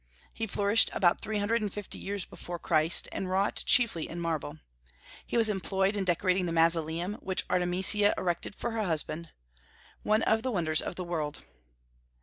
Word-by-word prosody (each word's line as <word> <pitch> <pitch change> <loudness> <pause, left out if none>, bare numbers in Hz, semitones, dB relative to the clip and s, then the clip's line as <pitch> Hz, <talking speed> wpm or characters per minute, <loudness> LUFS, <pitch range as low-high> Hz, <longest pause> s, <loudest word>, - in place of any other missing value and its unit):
He 225 - -4
flourished 205 +2 +3
about 175 -2 +2
three 215 0 -3
hundred 225 +3 0
and 210 -2 -2
fifty 205 0 -6
years 200 -2 -3
before 175 0 -8
Christ, 160 0 +2
and 190 - -4
wrought 195 +2 0
chiefly 230 - +3
in 170 - -6
marble. 160 -3 -3 0.7
He - - -1
was 225 -1 +5
employed 195 0 0
in 200 -2 -1
decorating 185 +1 +1
the - - -2
Mausoleum 165 +3 +1
which 190 -1 -1
Artemisia 185 +3 +3
erected 175 +2 -3
to 240 - -2
her 225 -1 -2
husband, 165 -2 -2 0.7
one 215 +1 +1
of 220 0 +2
the 260 - -2
wonders 165 -8 0
of - - -5
the 185 - -4
world. 160 -4 -4
185 Hz, 170 wpm, -29 LUFS, 170-210 Hz, 0.7 s, was